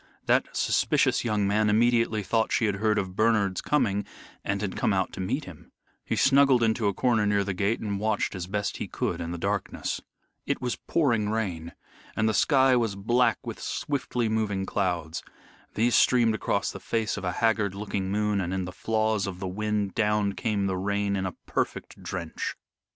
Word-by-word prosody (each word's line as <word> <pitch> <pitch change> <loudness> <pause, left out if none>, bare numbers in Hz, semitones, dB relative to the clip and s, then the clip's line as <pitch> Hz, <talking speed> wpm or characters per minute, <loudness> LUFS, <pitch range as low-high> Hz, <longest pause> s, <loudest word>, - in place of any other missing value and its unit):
That - - +1
suspicious - - +2
young 105 -3 +1
man 105 +1 +2
immediately 115 -1 +2
thought 110 +3 +1
she 115 - +2
had 100 -2 0
heard 105 +1 +1
of 95 -1 -2
Bernard's 105 -3 +2
coming 105 -9 +1 0.4
and 100 0 -1
had 100 -2 -3
come 105 - +1
out 95 -1 0
to - - -8
meet 125 +11 -2
him. 85 -4 -13 0.3
He - - -2
snuggled 135 -3 +5
into 110 -1 +2
a 100 - +1
corner 115 -4 +2
near 100 -1 +2
the 100 0 -2
gate 100 +5 0
and 100 -2 -3
watched 110 0 0
as 90 -3 -5
best 105 +1 -2
he - - -4
could - - -2
in 85 - -4
the 85 - -4
darkness. - - -2 0.5
It - - 0
was 125 -1 -2
pouring 115 -10 +1
rain, 90 -7 -3 0.4
and 110 - +1
the 110 - +2
sky 130 +4 +4
was 115 -5 +1
black 115 +3 +2
with - - -6
swiftly 125 -4 -2
moving 105 -3 -1
clouds. 90 -5 -2 0.5
These 115 +2 +2
streamed 120 -3 +4
across 110 - -1
the - - -8
face 115 -2 -1
of 105 - -6
a 90 -1 -1
haggard 110 -4 +1
looking 100 -2 -3
moon, 105 -1 +1
and 90 +1 -2
in 95 -1 -2
the 90 - -6
flaws 110 0 0
of 90 -2 -6
the 95 - -3
wind 105 0 -1
down 105 -2 +1
came 105 -1 -1
the 95 -1 -1
rain 100 +1 0
in 95 -1 -1
a 90 - -6
perfect - - -3
drench. 85 -4 -4
105 Hz, 195 wpm, -27 LUFS, 95-115 Hz, 0.5 s, snuggled